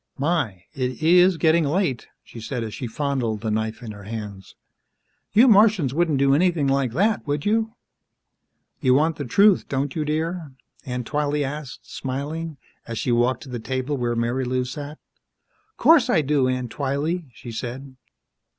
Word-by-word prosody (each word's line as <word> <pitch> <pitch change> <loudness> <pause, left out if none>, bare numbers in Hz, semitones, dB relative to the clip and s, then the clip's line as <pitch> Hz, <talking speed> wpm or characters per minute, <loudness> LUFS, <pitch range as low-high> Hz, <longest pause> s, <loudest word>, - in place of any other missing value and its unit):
"My, 135 - -1
it 130 +2 -3
is 180 +2 +5
getting 160 0 +3
late," 150 -4 -1 0.2
she 115 - -11
said 120 +1 -4
as 110 -2 -6
she 125 - -5
fondled 125 -4 -2
the 110 -1 -2
knife 110 +2 -2
in 110 - -6
her 100 -2 -11
hands. 105 -3 -7 0.8
"You 225 +6 +6
Martians 205 - +5
wouldn't 160 -2 +1
do 135 0 +3
anything 165 -1 +2
like 135 -3 +1
that, 200 - +1
would 145 0 -2
you?" 220 +2 +1 1.0
"You 130 -3 +3
want 155 +2 +2
the 145 - -4
truth, 200 - +4
don't 135 0 -2
you, 155 - 0
dear?" 160 0 -3 0.3
Aunt 125 -1 -3
Twylee 145 +1 0
asked, 140 -1 -6
smiling, 145 +4 -5 0.3
as 115 -1 -5
she 125 - -1
walked 120 +2 +1
to 140 - -11
the 125 -1 -4
table 130 +4 -2
where 120 -3 -1
Marilou 125 +2 -1
sat. 145 +4 -7 0.8
"'Course 300 -7 +5
I 165 -9 +4
do, 140 -2 +1
Aunt 125 -2 -2
Twylee," 145 +5 -2
she 120 +1 -10
said. 130 +4 -6
140 Hz, 165 wpm, -23 LUFS, 125-160 Hz, 1.0 s, You